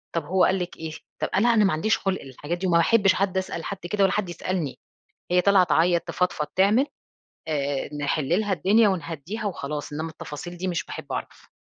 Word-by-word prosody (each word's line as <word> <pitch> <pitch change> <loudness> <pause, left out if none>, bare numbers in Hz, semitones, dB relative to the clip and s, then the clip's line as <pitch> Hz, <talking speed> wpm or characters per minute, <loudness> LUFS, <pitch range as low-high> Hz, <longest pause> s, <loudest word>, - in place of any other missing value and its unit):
طَب 165 -3 -1
هو 185 +4 +2
قال 190 0 +3
لِك 175 0 -5
إيه؟ 160 -1 -5 0.3
طَب - - 0
أنا 235 +4 +4
أنا 215 -2 +4
ما 195 - +2
عنديش 200 +8 +2
خُلْق 195 -1 -2
للحاجات 145 +6 -5
دي 185 +1 -2
وما 170 -1 +4
باحبش 195 +2 +4
حد 190 0 0
أسأل 185 -3 -3
حد 200 - -4
كده 205 -1 +2
ولا 190 - +3
حد 210 -4 -1
يسألني، 175 -4 -3 0.5
هي 180 - +5
طالعه 195 -1 +5
تعيّط، 170 +1 +3
تفضفض، 180 -4 -1
تعمل 210 +8 +4 0.6
آآ، 145 -1 -2
نحلّ 145 -1 -1
لها 205 -2 -1
الدنيا 205 +6 +4
ونهدّيها 175 +4 -3
وخلاص 150 -6 -4
إنما 160 +2 -3
التفاصيل 160 +3 -8
دي 185 +2 -3
مش 180 +2 -1
باحب - - -7
أعرَف. - - -6
180 Hz, 200 wpm, -25 LUFS, 155-195 Hz, 0.6 s, هي